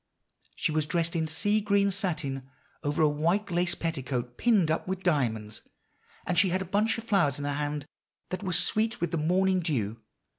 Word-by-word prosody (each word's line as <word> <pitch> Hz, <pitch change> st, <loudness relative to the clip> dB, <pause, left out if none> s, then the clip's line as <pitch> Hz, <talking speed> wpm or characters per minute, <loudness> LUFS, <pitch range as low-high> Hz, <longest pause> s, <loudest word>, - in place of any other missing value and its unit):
She 175 Hz, -, 0 dB
was 155 Hz, -1 st, 0 dB
dressed 170 Hz, 0 st, 0 dB
in 160 Hz, -1 st, 0 dB
sea 205 Hz, +7 st, +1 dB
green 200 Hz, -1 st, +2 dB
satin, 150 Hz, -9 st, -3 dB, 0.3 s
over 145 Hz, +2 st, +1 dB
a -, -, +6 dB
white 170 Hz, +7 st, 0 dB
lace 175 Hz, 0 st, +1 dB
petticoat 130 Hz, -6 st, -3 dB
pinned 200 Hz, -, +3 dB
up 160 Hz, -, -1 dB
with 190 Hz, 0 st, -3 dB
diamonds, 110 Hz, -10 st, 0 dB, 0.6 s
and 175 Hz, -1 st, +2 dB
she 190 Hz, 0 st, +4 dB
had 185 Hz, +2 st, +1 dB
a -, -, -10 dB
bunch 210 Hz, +5 st, +1 dB
of 225 Hz, -, -6 dB
flowers 195 Hz, -, +2 dB
in 145 Hz, -, -4 dB
her 145 Hz, -, -1 dB
hand 145 Hz, 0 st, -2 dB, 0.4 s
that 185 Hz, -, -4 dB
were 190 Hz, -3 st, -2 dB
sweet 215 Hz, +5 st, +1 dB
with 170 Hz, -2 st, -1 dB
the 170 Hz, -, 0 dB
morning 185 Hz, +4 st, +2 dB
dew. 115 Hz, -, -2 dB
170 Hz, 190 wpm, -28 LUFS, 145-190 Hz, 0.6 s, a